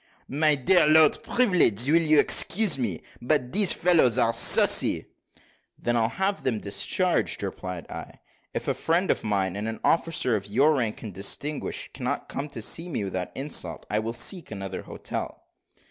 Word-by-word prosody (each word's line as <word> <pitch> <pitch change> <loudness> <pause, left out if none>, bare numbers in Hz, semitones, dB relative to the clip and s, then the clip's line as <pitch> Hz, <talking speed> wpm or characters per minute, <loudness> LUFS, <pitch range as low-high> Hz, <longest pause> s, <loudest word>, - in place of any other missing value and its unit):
"My 150 +2 +2
dear 150 +5 +3
Lord 155 0 +5
Privilege, 180 - +1
will 165 +3 +4
you 155 -2 +3
excuse 210 -3 +3
me? 100 -10 -3 0.2
but 125 0 0
these 205 -2 +3
fellows 165 -9 +3
are 115 -2 +2
saucy." 115 - +4 0.7
"Then 120 - -2
I'll 115 -1 +1
have 195 +5 -2
them 125 -4 -1
discharged," 105 - -1
replied 90 -3 -6
I. - - -9 0.4
"If - - -5
a - - +1
friend 170 +3 0
of - - -2
mine, 95 -3 -1
and 105 +2 -4
an 110 - -5
officer 165 -7 +1
of 100 -1 -4
your 135 +9 +3
rank 115 -7 -3
and 105 -4 -7
distinction, 140 - -2
cannot - - -4
come 145 +2 -5
to 115 -6 -5
see 165 +9 +1
me 130 -10 -3
without 95 -2 -4
insult, 115 - -2
I 105 - +1
will 115 +1 -4
seek 175 - -1
another 100 -2 -6
hotel." - - -7
125 Hz, 170 wpm, -25 LUFS, 105-165 Hz, 0.7 s, Lord